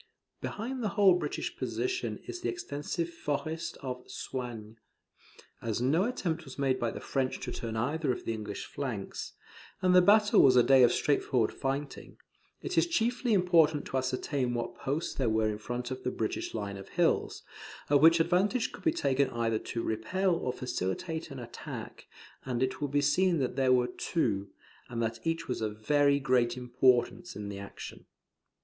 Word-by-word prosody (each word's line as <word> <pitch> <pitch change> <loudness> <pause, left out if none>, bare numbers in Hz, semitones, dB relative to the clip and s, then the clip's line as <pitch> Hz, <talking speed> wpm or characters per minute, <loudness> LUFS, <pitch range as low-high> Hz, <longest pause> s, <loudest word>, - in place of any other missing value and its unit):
Behind 250 +4 -4
the 215 - 0
whole 195 -3 +7
British 165 -4 -2
position 375 -1 -2
is 360 - -6
the - - -1
extensive 165 - -3
forest 160 0 -3
of 125 -1 -4
Soignies. 120 -4 -6 0.8
As 115 -1 -2
no 150 +10 +2
attempt 175 -9 -2
was 135 -3 -11
made 135 -2 +1
by 120 - 0
the - - -6
French 130 -2 -1
to 125 - -4
turn 115 -2 -4
either 145 +5 0
of 125 - -5
the 115 - -1
English 105 -2 -5
flanks, 125 -9 -5 0.5
and 185 -1 +3
the 180 - +8
battle 210 +3 +6
was 130 -2 +6
a 125 - +7
day 135 +1 +6
of 120 -1 +7
straightforward 130 -5 +1
fighting, 140 +1 -4 0.5
it - - +1
is - - +2
chiefly 245 -5 +1
important 165 -6 +4
to 135 - -2
ascertain 130 0 -1
what 120 - -3
posts 145 +5 -3
there 130 -4 0
were 110 0 +2
in 105 - -5
front 120 +3 -4
of 130 - -4
the - - -1
British 110 -2 -3
line 100 -2 -4
of 95 - -10
hills, - - +1 0.4
of 145 -1 +4
which 165 +1 +7
advantage 185 +8 +2
could - - -12
be 325 - +4
taken 140 - +1
either 115 -2 0
to 115 - -4
repel 180 - 0
or 165 -7 -1
facilitate 130 - -3
an 135 - -8
attack; 120 -2 -8 0.4
and 125 -1 -1
it 130 - -2
will 145 - +1
be 145 +1 +1
seen 170 +5 +3
that 130 -4 -1
there 130 -1 +3
were 125 -1 +4
two, 115 - -1 0.4
and 120 -1 -4
that 115 0 -1
each 165 0 -1
was 125 - -3
of 105 -1 -2
very 145 0 +4
great 125 -3 +2
importance 125 +7 +1
in 105 -1 -5
the 100 -1 -6
action. 100 - -9
135 Hz, 180 wpm, -30 LUFS, 120-165 Hz, 0.8 s, the